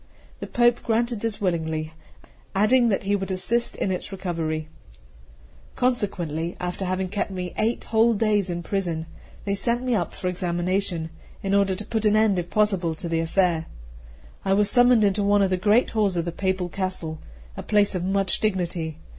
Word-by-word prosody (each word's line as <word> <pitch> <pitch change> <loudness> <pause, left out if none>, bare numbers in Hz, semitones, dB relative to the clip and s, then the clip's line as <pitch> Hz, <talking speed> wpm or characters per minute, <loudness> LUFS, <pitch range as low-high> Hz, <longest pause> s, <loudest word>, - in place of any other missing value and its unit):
The - - -6
Pope 240 0 +3
granted 235 0 0
this 225 -1 -2
willingly, 160 -4 -2 0.6
adding 235 +4 +4
that 195 - 0
he 200 +1 +1
would 195 -1 -3
assist 225 +6 0
in 190 - -1
its 185 - -3
recovery. 165 -5 -3 1.1
Consequently, 175 -10 -1
after 180 +2 -3
having 185 +1 -1
kept 205 +2 -2
me 180 -2 -5
eight 225 +2 0
whole 225 +1 +3
days 210 -3 +1
in 175 0 -3
prison, 170 -4 -2 0.4
they 200 - 0
sent 235 +5 0
me 255 -1 0
up 180 -7 -1
for 185 - -4
examination, 175 -1 -1 0.3
in 195 0 -1
order 200 -1 +3
to 210 - -6
put 220 0 -2
an 210 0 +4
end 215 -4 +3
if 175 0 -5
possible 195 -6 +1
to 165 - -5
the 165 -1 0
affair. 165 -1 +1 0.8
I 195 - +2
was 205 0 +3
summoned 245 -2 +5
into 200 0 +2
one 200 0 +3
of 190 - +1
the - - +3
great 210 +6 +3
halls 210 -4 +1
of 170 -1 -1
the 170 - -2
papal 190 +1 -1
castle, 180 -4 -3 0.4
a - - -5
place 205 -1 +2
of 180 -2 -2
much 195 +1 +1
dignity. 175 -6 -2
195 Hz, 180 wpm, -24 LUFS, 175-210 Hz, 1.1 s, summoned